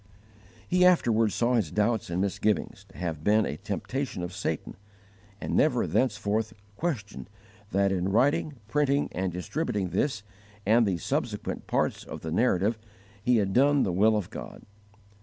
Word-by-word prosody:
He 180 0 +3
afterward 115 - +4
saw 120 +4 +1
his 110 -9 +1
doubts 105 +3 0
and 85 +1 -1
misgivings 100 0 -1
to 95 - -16
have 80 -4 -4
been 105 +3 +4
a 75 - -4
temptation 130 - -4
of 90 +1 -5
Satan, 95 -5 -3 0.6
and - - -3
never - - +3
thenceforth 110 +1 0 0.2
questioned 115 - -4 0.4
that 100 0 +2
in 95 0 0
writing, 140 +7 +2
printing, 145 +2 +1
and 95 0 -2
distributing 95 - -2
this 110 0 -1 0.4
and 110 +2 +4
the 95 -3 0
subsequent - - -3
parts - - 0
of - - -8
the 80 - -5
Narrative 110 +2 +2 0.4
he 120 +3 +3
had 100 -3 0
done 140 +2 +4
the 90 - 0
will 110 +4 +4
of 105 - -4
God. - - -8
105 Hz, 155 wpm, -27 LUFS, 95-125 Hz, 0.6 s, afterward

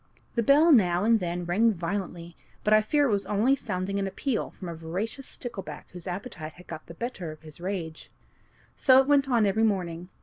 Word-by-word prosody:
The 235 - +1
bell 295 +7 +5
now 180 - +4
and 225 +1 +4
then 175 -1 -3
rang 210 +6 +3
violently, 175 -1 -4 0.3
but 210 - +3
I 215 - +7
fear 290 +7 +2
it - - 0
was 200 -1 0
only 220 +7 +3
sounding 195 -5 -3
an 195 - -1
appeal 230 +4 -2
from 185 - -10
a 170 - -4
voracious 185 +11 -5
stickleback 235 -6 -8
whose 180 +1 -10
appetite 180 -4 -6
had 180 +2 -15
got 155 - -9
the 170 - -10
better 190 -7 -5
of 155 0 -13
his 155 +1 -13
rage. 175 -4 -5 0.7
So 260 -1 +6
it 265 - +2
went 285 -1 +3
on 235 -4 +3
every 200 +2 +1
morning. 180 -5 -1
195 Hz, 205 wpm, -27 LUFS, 175-230 Hz, 0.7 s, I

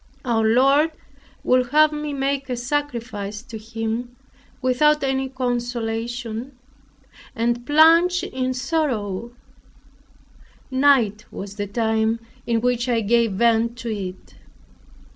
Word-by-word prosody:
Our 230 -3 +1
Lord 275 +8 +4 0.5
would 250 -1 +2
have 305 +2 +5
me 300 0 -4
make 275 0 -2
a 250 - -2
sacrifice 235 -6 -3
to 230 -3 -9
Him, 225 +2 -4 0.4
without 290 +4 +3
any 265 0 0
consolation, 240 -1 -3 0.8
and 240 +1 0
plunged 330 +4 +5
in 255 0 -2
sorrow, 250 - -2 1.4
night 260 -6 +3
was 200 0 -8
the 205 0 -3
time 220 +1 0 0.3
in 230 -1 +1
which 245 0 0
I 235 -2 +2
gave 230 0 +2
vent 230 +2 +2
to 235 -3 -4
it. 185 -2 -7
240 Hz, 110 wpm, -22 LUFS, 225-270 Hz, 1.4 s, have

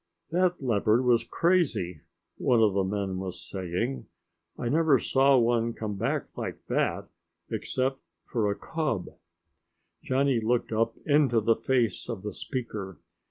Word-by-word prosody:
"That 180 -2 +1
leopard 115 0 +2
was 120 -2 +4
crazy," 140 - +1 0.4
one 120 - +3
of 110 -3 +4
the 100 0 +2
men 95 -1 -2
was 95 -1 -5
saying. 95 +7 -3 0.5
"I 120 - -3
never 155 +1 +4
saw 135 +2 +4
one 115 -1 +2
come 105 -2 -4
back 95 - -2
like - - -6
that, - - 0 0.4
except 135 +1 -1 0.3
for 110 -4 0
a 100 - 0
cub!" 155 - -2 0.9
Johnny 135 -1 +1
looked 115 +2 0
up 115 +1 +1
into 145 -6 +4
the 115 +1 +3
face 125 -5 0
of 110 -5 -4
the 105 -1 -4
speaker. 105 - -5
115 Hz, 140 wpm, -28 LUFS, 105-135 Hz, 0.9 s, was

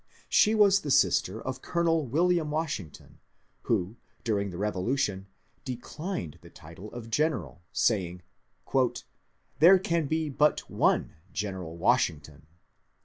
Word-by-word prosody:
She 215 +1 +4
was 200 -2 +5
the 150 - -5
sister 130 -6 +2
of 130 +2 -5
Colonel 165 -4 0
William 165 +4 +1
Washington, 150 - -5 0.5
who 105 0 0 0.3
during 100 -3 0
the 90 - -7
Bevolution 100 0 -1 0.4
declined 130 - -5
the - - -14
title 85 +7 -12
of 115 -2 -9
General, 150 - -1
saying, 90 -5 0 0.4
^^ 130 -2 0 0.6
There 175 +5 +8
can 170 -4 -1
be 160 +1 -1
but 150 +1 +1
one - - +1 0.2
General 95 -5 -5
Washington." 80 - 0
120 Hz, 120 wpm, -28 LUFS, 95-155 Hz, 0.6 s, There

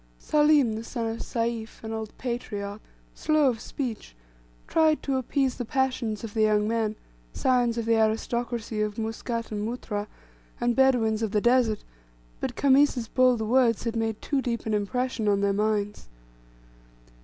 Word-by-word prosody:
Salim, 295 - +3
the 220 +1 -5
son 230 0 -4
of 225 0 -3
Sayf, 230 -2 -3
an 220 0 -5
old 220 -1 -4
patriarch, 210 -4 -4 0.3
slow 305 -3 +2
of 230 -3 -2
speech, 230 - -5 0.5
tried 315 -1 +3
to 275 - 0
appease 260 0 0
the - - -2
passions 250 -3 -1
of 220 -2 -6
the 220 - 0
young 210 -1 +3
men, 220 -1 0 0.4
scions 245 -2 +2
of 230 - -1
the 230 0 +3
aristocracy 225 0 -1
of 210 -1 -2
Muscat 230 +1 -3
and 210 -1 -3
Muttrah, 215 -2 -4 0.5
and 240 0 +1
Bedaweens 240 -5 +3
of 220 -3 -2
the 210 - +3
Desert, 240 -3 +3 0.6
but - - -3
Khamis's 270 -3 +3
bold 255 -3 +3
words 230 0 +3
had 230 -1 -2
made 225 -1 -1
too 280 -2 0
deep 235 -2 -3
an 220 - -1
impression 225 +2 -1
on 200 -1 +3
their 200 0 +2
minds. 210 - -1
230 Hz, 160 wpm, -26 LUFS, 215-250 Hz, 0.6 s, Salim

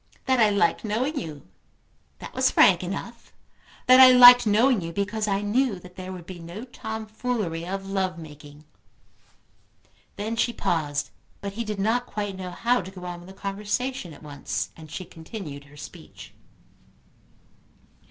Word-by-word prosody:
"That 260 -2 +2
I 220 -2 +5
liked 200 -5 +1
knowing 250 +8 -1
you; 150 - -8 0.7
that - - -10
was - - +2
frank 180 -2 +5
enough; 200 +6 -7 0.5
that 255 0 +7
I 260 -1 +11
liked 245 -1 +9
knowing 225 +2 +3
you 165 0 -5
because 210 +3 -2
I 200 0 0
knew 220 +1 +1
that 180 0 -14
there 185 0 -7
would 180 -3 -9
be 180 0 -9
no 170 +6 -8
tomfoolery 220 -6 -4
of 195 +1 -4
love 190 -2 -1
making." 150 -2 -12 1.5
Then 215 +3 -3
she 235 +1 0
paused; 145 -7 -1 0.3
but 200 -1 -6
he 230 +3 -3
did 210 -2 -5
not 230 +5 0
quite 205 -2 -4
know 185 -1 -6
how 235 +6 +1
to 185 - -9
go 185 -2 -10
on 175 -1 -6
with 175 +2 -13
the 190 - -12
conversation 205 +2 -3
at 150 - -14
once, 145 -2 -4
and 160 -1 -13
she 185 - -6
continued 160 -4 -9
her 145 0 -17
speech. - - -12
195 Hz, 160 wpm, -25 LUFS, 170-225 Hz, 1.5 s, I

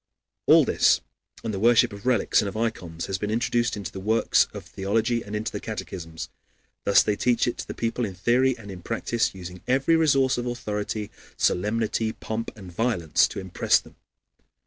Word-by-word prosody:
All - - +7
this, - - +3 0.4
and 115 -2 -3
the 95 - -3
worship 120 +1 +4
of 100 +4 -8
relics 120 -3 +3
and 100 - -2
of 100 - -7
ikons, 90 -8 -3
has 95 -1 -3
been 105 - -2
introduced 120 +1 0
into 100 -1 -6
works 110 +4 +3
of - - -8
theology 115 +5 0
and 105 +1 -6
into 110 +1 -2
the - - -4
catechisms. 80 -2 -6 0.6
Thus 100 - +6
they 105 - 0
teach 120 +2 +2
it 120 - -2
to - - -5
the - - -6
people 115 +1 -1
in 100 -4 -3
theory 125 +6 +2
and 100 -3 -10
in 90 -2 -9
practice, 115 +1 -1
using 90 -1 -9
every 135 +6 +3
resource 135 -6 +3
of 120 - -3
authority, 105 -3 -3 0.3
solemnity, 110 +3 0
pomp, 110 +1 -4
and 95 -4 -10
violence 90 -5 +2
to - - -6
impress 95 -2 +2
them. - - -17
110 Hz, 185 wpm, -25 LUFS, 100-120 Hz, 0.6 s, All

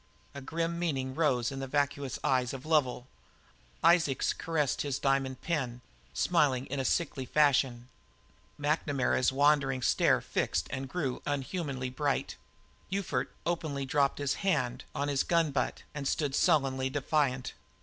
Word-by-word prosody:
A 140 - -7
grim 165 +4 -2
meaning 135 -6 -1
rose 130 -6 +1
in 135 - -5
the 135 - -4
vacuous 145 -1 -1
eye 130 -1 +3
of 135 0 -7
Lovel; 145 -6 +1 0.8
Isaacs 165 -6 +3
caressed 155 -5 -1
his 140 -3 -1
diamond 135 -2 0
pin, 130 -8 -2 0.3
smiling 135 - +2
in 140 +1 -4
a 135 - -1
sickly 145 -4 0
fashion; 130 -5 +2 0.7
McNamara's 145 -4 +1
wandering 135 -2 +2
stare - - +3
fixed 80 - -1
and 130 0 -4
grew 140 -7 -2
unhumanly 140 -2 -3
bright; 140 +2 -1 0.6
Ufert 195 -1 -1 0.2
openly 155 -5 -2
dropped 140 +1 +1
his 145 -1 0
hand 125 -11 0
on 145 - -1
his 140 -2 +1
gun 165 -3 +2
butt 135 -2 -2
and 145 -2 -3
stood 145 -2 0
sullenly 135 -2 +2
defiant. 135 -2 0
140 Hz, 140 wpm, -30 LUFS, 130-150 Hz, 0.8 s, eye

